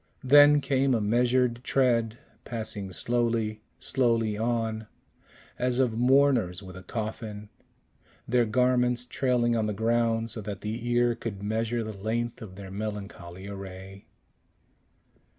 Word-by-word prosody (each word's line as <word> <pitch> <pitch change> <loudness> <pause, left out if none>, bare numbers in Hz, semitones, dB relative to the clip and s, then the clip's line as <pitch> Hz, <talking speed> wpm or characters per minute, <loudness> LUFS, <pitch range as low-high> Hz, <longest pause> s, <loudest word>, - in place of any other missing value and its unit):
Then 145 +2 +7
came 135 -1 +2
a - - +1
measured 120 +2 +1
tread, 120 -4 +1 0.3
passing 110 -4 -4
slowly, 115 +1 -1 0.2
slowly 115 -4 +1
on, 110 -1 -1 0.7
as 125 0 +1
of 130 -3 +2
mourners 125 -6 +3
with 95 -1 -10
a 95 - -9
coffin, 105 0 -5 0.8
their 120 0 +3
garments 125 +1 +2
trailing 125 -2 +1
on 110 -2 0
the 105 - -1
ground, 115 +1 +1
so 110 - -5
that 100 -2 -6
the 115 +3 -4
ear 120 0 +3
could 105 -4 -6
measure 115 +2 -1
the 110 0 -5
length 110 +4 -3
of 100 -4 -9
their 95 -1 -9
melancholy 100 -3 -6
array. 95 0 -9
115 Hz, 130 wpm, -27 LUFS, 105-120 Hz, 0.8 s, Then